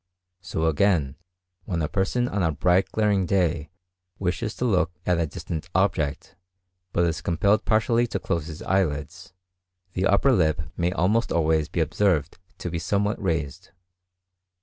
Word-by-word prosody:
So 80 -4 -3
again 80 -4 +2 0.5
when 85 -5 -2
a - - 0
person 105 +8 0
on 100 -4 -2
a 80 -2 +2
bright, 90 +5 +2
glaring 105 -4 +1
day 85 -5 +1 0.5
wishes 100 +4 -2
to 125 - -2
look 90 -8 +2 0.2
at 90 -2 +2
a 85 - +1
distant 80 +3 -6
object, 85 -7 0 0.6
but 85 - +2
is 80 -1 -1
compelled 100 +5 +1
partially 115 +2 +2
to 110 - -2
close 85 -4 -2
his 80 -2 -8
eyelids, 85 -1 -1 0.6
the 95 +1 +1
upper 100 +8 +4
lip 80 - +2
may 85 +1 0
almost 100 +6 +1
always 80 -2 +1
be 85 - -1
observed 85 0 +1 0.2
to 90 - -5
be 85 - -2
somewhat 100 +5 0
raised. 80 -7 -2
90 Hz, 150 wpm, -25 LUFS, 80-100 Hz, 0.6 s, upper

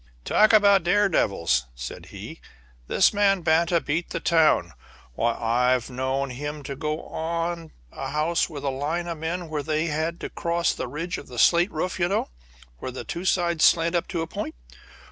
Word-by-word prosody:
"Talk 215 - +4
about 200 -2 +6
daredevils!" 100 - +2
said - - -7
he, - - -9 0.5
"this - - +4
man 200 -2 +3
Banta 170 +1 +3
beat 165 +3 -2
the 170 - -3
town. 155 - +3 0.4
Why, 115 - 0
I've 125 +2 +1
known 130 +1 -2
him 145 +3 -5
to 140 0 -5
go 150 +3 -3
up - - -14
on 165 0 -3 0.2
a - - -5
house 155 +5 0
with 145 -4 -7
a 140 - 0
line 150 +6 -2
of 170 -2 -5
men 170 +2 -3
where 155 -2 -3
they 155 +2 -1
had 165 +2 -2
to - - -5
cross 170 0 0
the - - -4
ridge 165 +7 -4
of - - -13
a 125 - -9
slate 175 - +4
roof 185 -1 -3
you 175 - +2
know, 195 - -1 0.5
where - - -5
the 130 - -6
two 175 +2 -5
sides 170 -3 +1
slant 165 0 +4
up 175 - 0
to 170 -3 -3
a - - -3
point. 210 - -5
160 Hz, 190 wpm, -25 LUFS, 140-175 Hz, 0.5 s, about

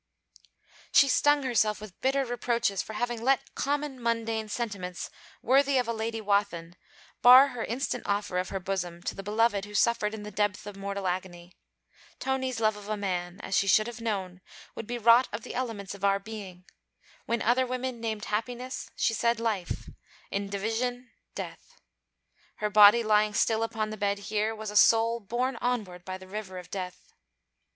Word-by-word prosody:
She 280 - +6
stung 290 +2 +3
herself 220 -4 +1
with 210 -4 -12
bitter 270 +1 +1
reproaches 235 -5 0
for 220 - -8
having 240 +1 -2
let 270 +2 +1
common 285 -2 -2
mundane 225 -2 -1
sentiments, 200 -6 -4 0.3
worthy 275 +2 +4
of 250 -2 +1
a 230 - -1
Lady 225 0 -3
Wathin, 200 -5 0 0.5
bar 255 +3 +9
her 245 -3 -5
instant 255 +5 -2
offer 200 -3 0
of 185 - -3
her 195 - -3
bosom 180 -2 -4
to - - -2
the - - -7
beloved 210 0 +1
who 210 0 -10
suffered 220 0 +2
in 210 - -8
this 210 -1 -8
depth 205 0 -1
of 205 -1 -7
mortal 200 0 -4
agony. 180 -1 -4 0.6
Tony's 260 -2 -2
love 215 -1 +2
of 210 0 -10
a 215 - -1
man, 180 -3 -3
as 195 - -3
she 200 - +2
should 215 +2 +5
have 240 0 -7
known, 190 -5 -3 0.3
would 220 - -7
be 240 +1 -3
wrought 235 +2 +6
of 205 +2 -5
the - - -7
elements 225 -7 -4
of 200 -1 -12
our 200 0 +4
being: 195 -3 -9 0.6
when 235 -1 0
other 250 +3 +3
women 255 -1 -3
named 220 -2 -3
Happiness, 245 +4 -4
she 225 - +1
said 235 +1 +1
Life; 215 -6 -2 0.4
in 200 0 -2
division, 235 +5 -2 0.2
Death. - - -8 0.8
Her 210 0 -2
body 210 +3 +8
lying 210 -1 +3
still 220 0 +2
upon 220 -1 -2
the 215 - -6
bed 200 -1 0
here 210 +2 -1
was 215 -1 -6
a - - -9
soul 230 +3 +5
borne 240 +4 -2
onward 210 -9 -2
by 185 +1 -5
the 185 0 -13
river 190 -1 -6
of 180 -1 -10
Death. 185 -2 -7
215 Hz, 180 wpm, -28 LUFS, 200-240 Hz, 0.8 s, bar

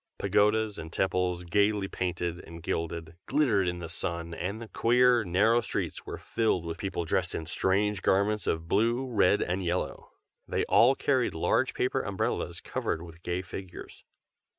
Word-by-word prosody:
Pagodas 105 0 +2
and 80 0 -7
temples, 90 -1 0
gaily 100 +3 +2
painted, 90 -2 -3
and 85 -1 -11
gilded, 85 0 -3
glittered 120 -10 +2
in 90 0 -1
the 85 -1 -6
sun, 85 0 -3
and 95 +6 -4
the 115 - -8
queer, 120 +1 +4
narrow 110 +6 +3
streets - - -4
were - - -5
filled 110 -7 0
with 85 0 -5
people 90 -4 -3
dressed 85 +2 0
in 80 - -4
strange 100 +3 +1
garments 100 +3 +1
of 80 0 -1
blue, 115 +7 +2
red, 105 -5 +3
and 90 +2 -2
yellow. 90 +1 -2 0.4
They - - 0
all 125 +4 +5
carried 130 -8 +1
large 80 - +1
paper - - 0
umbrellas - - -2
covered 80 - -3
with 85 0 -12
gay 90 +2 -2
figures. 95 -1 -9
95 Hz, 160 wpm, -29 LUFS, 85-105 Hz, 0.4 s, all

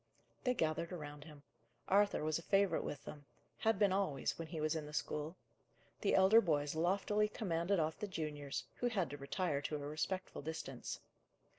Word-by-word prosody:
They 250 0 +3
gathered 160 -1 0
around 150 -4 -6
him. 150 -3 -12 0.4
Arthur 200 -3 +4
was 155 +1 +1
a - - -8
favourite 195 +2 +3
with 145 - -5
them; 145 -1 -9 0.3
had 225 -2 +3
been 200 -1 +4
always, 185 -10 0
when 165 - -4
he 160 0 -5
was 155 +1 +1
in 155 -2 -3
the 150 - -9
school. 150 +5 -2 0.6
The - - +2
elder 195 +4 +7
boys 150 -6 +1
loftily 195 +6 +2
commanded 185 -2 0
off 155 0 0
the 210 - -2
juniors, 150 -6 -3
who 245 - +1
had 195 - 0
to 145 - -5
retire 145 +1 -1
to 150 - -2
a 145 -1 -4
respectful 175 +5 -3
distance. 140 -4 -5
160 Hz, 180 wpm, -37 LUFS, 150-195 Hz, 0.6 s, elder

